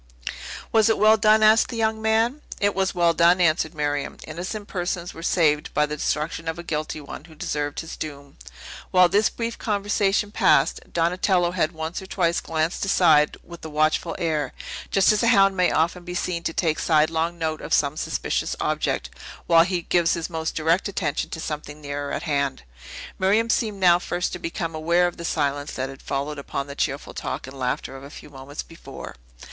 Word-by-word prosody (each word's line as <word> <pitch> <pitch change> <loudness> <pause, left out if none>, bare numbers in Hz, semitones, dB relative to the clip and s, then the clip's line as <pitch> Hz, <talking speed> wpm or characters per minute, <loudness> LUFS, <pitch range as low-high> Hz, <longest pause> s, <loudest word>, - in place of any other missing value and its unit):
"Was 220 -1 +4
it 225 - +3
well 215 +1 +6
done?" 215 0 +4
asked 215 +1 +6
the 235 - -5
young 220 -1 0
man. 225 +6 +1 0.2
"It 205 0 +2
was 190 0 0
well 170 -1 +3
done," 170 +2 +4
answered 160 -1 +2
Miriam; 145 -1 -2
"innocent 185 +6 -6
persons 175 -1 -3
were 165 - -10
saved 155 -4 +2
by 150 - +4
the 150 0 -4
destruction 155 +2 -2
of 160 +1 -2
a 170 - -7
guilty 155 -1 -3
one, 145 0 -9
who 160 -2 -15
deserved 145 -1 -3
his 160 - -8
doom." 140 -2 -8 0.5
While 180 -1 +5
this 205 +4 +3
brief 230 0 -4
conversation 205 -1 0
passed, - - +3
Donatello 175 +1 +1
had 175 -2 0
once 160 +3 -4
or 190 - -10
twice 170 -3 +1
glanced 160 +1 -1
aside 160 -6 +4
with 170 0 -12
a 160 - -6
watchful 155 +1 +1
air, 155 -5 -1 0.4
just 195 +1 +4
as 215 - +1
a 230 - +2
hound 195 -4 +5
may 180 -1 +3
often 170 +3 0
be 180 0 -6
seen 175 -1 -2
to - - 0
take 160 -2 0
sidelong 160 +1 +1
note 160 -2 -2
of - - -8
some 140 0 +2
suspicious - - -2
object, - - -1 0.3
while 165 -1 +6
he 180 -2 -2
gives 170 -1 +2
his 170 +1 -4
more 160 -1 -4
direct 165 +5 +1
attention 180 -7 -2
to 160 - -6
something 150 -1 -5
nearer 145 -1 -5
at, - - -3
hand. 140 - -1 0.6
Miriam 215 +5 +3
seemed 215 -4 0
now 175 -2 +5
first 180 0 -2
to - - -5
become 165 0 -4
aware 170 +3 +2
of 175 - -3
the 170 - -7
silence 145 -2 -1
that 130 +1 -3
had 135 - -11
followed 140 +2 -3
upon 140 0 -4
the 140 - -8
cheerful - - -3
talk - - -4
and 130 +1 -10
laughter 125 +1 -2
of 135 - -10
a 140 - -9
few 150 - -12
moments 135 +1 -7
before. 165 - -10
170 Hz, 195 wpm, -24 LUFS, 150-190 Hz, 0.6 s, well